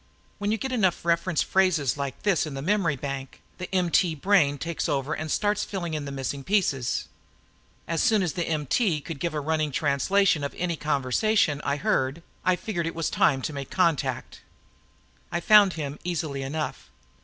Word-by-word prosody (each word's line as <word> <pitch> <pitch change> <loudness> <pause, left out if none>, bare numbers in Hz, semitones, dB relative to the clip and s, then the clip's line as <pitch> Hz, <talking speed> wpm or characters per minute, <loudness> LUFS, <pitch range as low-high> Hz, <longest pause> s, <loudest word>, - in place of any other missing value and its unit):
When 205 0 -1
you 220 - +1
get 265 +3 -4
enough 190 -9 +1
reference 170 -1 +1
phrases 175 -9 +2
like 140 -2 -5
this 190 -6 +2
in 145 - -6
the 135 - -5
memory 185 -4 +1
bank, 135 0 -6 0.2
the 180 - -5
MT 180 -2 +2
brain 155 -4 +3
takes 165 +3 -3
over 140 +1 -1
and 155 0 -4
starts 205 +5 +1
filling 175 -5 -4
in 150 -2 -3
the 140 - -5
missing 135 0 -4
pieces. 150 - 0 0.8
As 165 -1 0
soon 215 -3 +3
as 175 - -1
the 175 -2 -2
MT 155 - 0
could 155 -1 -7
give 170 0 -2
a - - 0
running 155 0 -1
translation 155 +5 +2
of 140 - -4
any 175 -1 -1
conversation 150 - +1
it 140 +1 0
heard, 135 +6 0 0.2
I 185 0 +3
figured 180 -5 -3
it 165 - -4
was 165 -2 -1
time 135 -4 +2
to 155 - -3
make 140 -2 -6
a - - -9
contact. 170 -6 0 0.9
I 170 - 0
found 205 0 +6
him 150 -2 -5
easily 160 -5 -3
enough. 150 +3 -4
160 Hz, 185 wpm, -26 LUFS, 140-185 Hz, 0.9 s, found